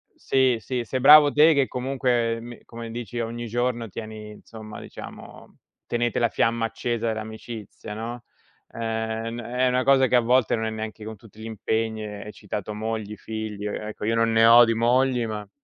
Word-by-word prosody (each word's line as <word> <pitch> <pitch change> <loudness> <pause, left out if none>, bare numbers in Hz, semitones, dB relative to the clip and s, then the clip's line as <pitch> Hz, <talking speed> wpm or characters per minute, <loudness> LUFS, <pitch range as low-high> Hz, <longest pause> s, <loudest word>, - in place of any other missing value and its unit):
sì, 130 -3 +2
sì, 125 +2 -3
sei 130 +3 -3
bravo 145 +2 +8
te 155 +1 +6
che 140 -1 +3
comunque 125 -3 0
mi, 120 0 -10
come 115 -1 -8
dici 120 0 -5
ogni 115 +1 -4
giorno 120 0 -1
tieni, 110 +1 -8
insomma, 110 0 -11
diciamo, - - -11 0.3
tenete 120 0 0
la 120 -1 +2
fiamma 115 0 +1
accesa 115 +1 -2
dell'amicizia, 110 -1 -6
no? 120 +2 -6 0.5
Ehm 115 0 -3
n - - -5
è 125 +2 0
una 125 0 +1
cosa 135 0 +5
che 125 - +2
a - - +7
volte 120 0 +2
non 110 0 -2
è - - -1
neanche 110 0 -6
con 110 0 -7
tutti 110 +1 -18
gli - - -7
impegni, 110 0 -2
e 105 -1 -7
hai 105 - -7
citato 105 0 -6
mogli, 110 -1 -4
figli, 110 0 -6
io 105 - -2
ecco, 105 0 -6
io 115 - +1
non 115 0 +2
ne 115 0 +5
ho 120 +1 +9
di 115 - +1
mogli, 125 +1 +2
ma 105 -2 -5
115 Hz, 190 wpm, -24 LUFS, 110-120 Hz, 0.5 s, ho